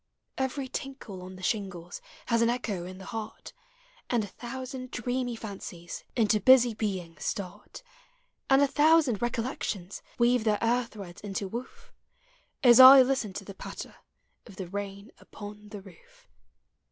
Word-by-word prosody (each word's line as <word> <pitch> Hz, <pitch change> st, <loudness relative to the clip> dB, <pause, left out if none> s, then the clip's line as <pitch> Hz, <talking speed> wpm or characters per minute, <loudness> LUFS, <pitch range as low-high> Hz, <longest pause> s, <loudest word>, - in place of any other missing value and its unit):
Every 265 Hz, +1 st, -2 dB
tinkle 260 Hz, -8 st, -7 dB
on 185 Hz, +1 st, -9 dB
the 185 Hz, -, -12 dB
shingles 180 Hz, -5 st, -3 dB, 0.2 s
Has 230 Hz, -1 st, +2 dB
an 230 Hz, -, +4 dB
echo 220 Hz, -7 st, -2 dB
in 185 Hz, 0 st, -9 dB
the 190 Hz, -, -11 dB
heart; 220 Hz, 0 st, -7 dB, 0.6 s
And 235 Hz, -3 st, +1 dB
a 205 Hz, -, -7 dB
thousand 255 Hz, +3 st, -7 dB
dreamy 245 Hz, 0 st, -2 dB
fancies 190 Hz, -6 st, -8 dB
Into 215 Hz, -2 st, +3 dB
busy 245 Hz, +2 st, +6 dB
being 185 Hz, -7 st, -4 dB
start, 195 Hz, -, -6 dB, 0.7 s
And 270 Hz, +1 st, +6 dB
a -, -, +4 dB
thousand 295 Hz, -5 st, +3 dB
recollections 230 Hz, -5 st, -3 dB, 0.2 s
Weave 240 Hz, -1 st, +3 dB
their 215 Hz, -2 st, +2 dB
air 240 Hz, +2 st, +1 dB
threads 195 Hz, -6 st, -10 dB
into 200 Hz, -1 st, -4 dB
woof, 235 Hz, +6 st, -8 dB, 0.7 s
As 240 Hz, -2 st, +8 dB
I 260 Hz, +1 st, +11 dB
listen 255 Hz, -5 st, -1 dB
to 195 Hz, +1 st, -7 dB
the 200 Hz, -, -8 dB
patter -, -, -9 dB, 0.5 s
Of 205 Hz, -, -13 dB
the 185 Hz, -1 st, -6 dB
rain 200 Hz, +2 st, -6 dB
upon 210 Hz, 0 st, -11 dB
the 205 Hz, -1 st, -8 dB
roof. 485 Hz, -, -18 dB
220 Hz, 150 wpm, -28 LUFS, 195-250 Hz, 0.7 s, I